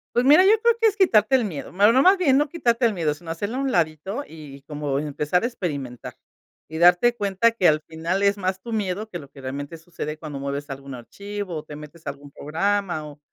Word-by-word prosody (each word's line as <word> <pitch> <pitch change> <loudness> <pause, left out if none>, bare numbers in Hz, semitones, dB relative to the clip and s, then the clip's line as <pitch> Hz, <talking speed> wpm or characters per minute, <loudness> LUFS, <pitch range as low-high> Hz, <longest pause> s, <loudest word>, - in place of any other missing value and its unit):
Pues 240 - +3
mira, 300 +7 +7
yo 405 - +6
creo 470 -1 +4
que 455 - +5
es 410 - +1
quitarte 265 - +4
el 255 - +3
miedo, 170 -8 -6
bueno, 205 +4 +5
no, 260 +3 +4
más 375 +6 +6
bien 275 -8 +3
no 295 +1 +2
quitarte 245 -6 +1
el 225 - +2
miedo, 165 -5 0
sino 165 +2 -9
hacerlo 205 +9 -4
a - - -1
un 270 -2 -1
ladito 175 - -1
y 145 -4 -12
como 145 -1 -3
empezar 150 +4 -1
a - - +1
experimentar. 145 - -5 0.5
Y 160 - -6
darte 175 +8 +5
cuenta 205 +2 +2
que 210 -6 +2
al 155 0 +3
final 165 +5 -3
es 200 +1 +3
más 185 0 -2
tu 235 - -8
miedo 210 0 -2
que 175 - -6
lo 140 -3 -13
que 140 0 -14
realmente 140 +4 -6
sucede 160 -2 -7
cuando 150 -3 -7
mueves 140 +1 -4
algún 135 -1 -7
archivo 200 - -7
o 150 - -6
te 150 - -9
metes 150 +2 -12
a 140 - 0
algún 145 0 -15
programa 175 +2 -1
o 150 -1 -11
175 Hz, 240 wpm, -23 LUFS, 150-225 Hz, 0.5 s, mira